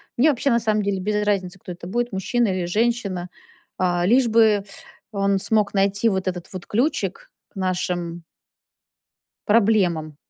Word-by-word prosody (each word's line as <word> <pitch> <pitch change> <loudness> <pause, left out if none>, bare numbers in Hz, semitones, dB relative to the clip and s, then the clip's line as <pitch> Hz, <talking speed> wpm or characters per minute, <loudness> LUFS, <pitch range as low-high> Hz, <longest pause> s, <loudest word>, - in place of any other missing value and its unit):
Мне 275 +6 +4
вообще, 280 0 +1
на 235 - +3
самом 215 -1 +1
деле, 200 -1 -1
без 210 +2 0
разницы, 195 -2 -1
кто 180 - -8
это 175 0 -10
будет- 240 +4 -1
мужчина 230 +5 0
или 185 -2 -1
женщина. 200 -2 -1 0.5
А, 175 -1 +1
лишь 240 +4 +4
бы 220 -2 +4 0.5
он 200 -1 +1
смог 205 0 +1
найти 200 +3 +2
вот 190 -2 -1
этот 180 -2 -6
вот 185 -2 -7
ключик 320 - -1 0.2
к - - -39
нашим 175 -2 -2 1.2
Проблемам. 190 -8 +2
200 Hz, 150 wpm, -22 LUFS, 185-230 Hz, 1.2 s, Мне